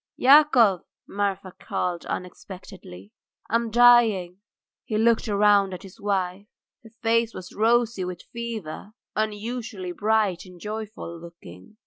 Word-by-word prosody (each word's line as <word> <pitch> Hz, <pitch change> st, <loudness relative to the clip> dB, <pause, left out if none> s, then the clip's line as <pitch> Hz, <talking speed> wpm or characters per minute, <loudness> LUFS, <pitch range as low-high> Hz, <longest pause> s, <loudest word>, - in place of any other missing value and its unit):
"Yakov!" 255 Hz, -, +5 dB, 0.3 s
Marfa 195 Hz, -2 st, -3 dB
called 175 Hz, -1 st, -3 dB
unexpectedly. 180 Hz, -, -9 dB, 0.4 s
"I -, -, -7 dB
am 230 Hz, 0 st, +1 dB
dying." 220 Hz, -6 st, +4 dB, 0.4 s
He 215 Hz, -, -3 dB
looked 230 Hz, +1 st, +2 dB
round 200 Hz, -2 st, +3 dB
at -, -, -11 dB
his 195 Hz, -1 st, -14 dB
wife. 195 Hz, -1 st, -2 dB, 0.3 s
Her 225 Hz, -, -15 dB
face 230 Hz, 0 st, +1 dB
was 185 Hz, -1 st, -9 dB
rosy 230 Hz, -1 st, +2 dB
with 180 Hz, -1 st, -6 dB
fever, 220 Hz, -5 st, -6 dB, 0.2 s
unusually 215 Hz, -2 st, -4 dB
bright 210 Hz, -2 st, 0 dB
and 180 Hz, -2 st, -15 dB
joyful 210 Hz, -4 st, -7 dB
looking. 170 Hz, -, -14 dB
205 Hz, 120 wpm, -24 LUFS, 180-225 Hz, 0.4 s, Yakov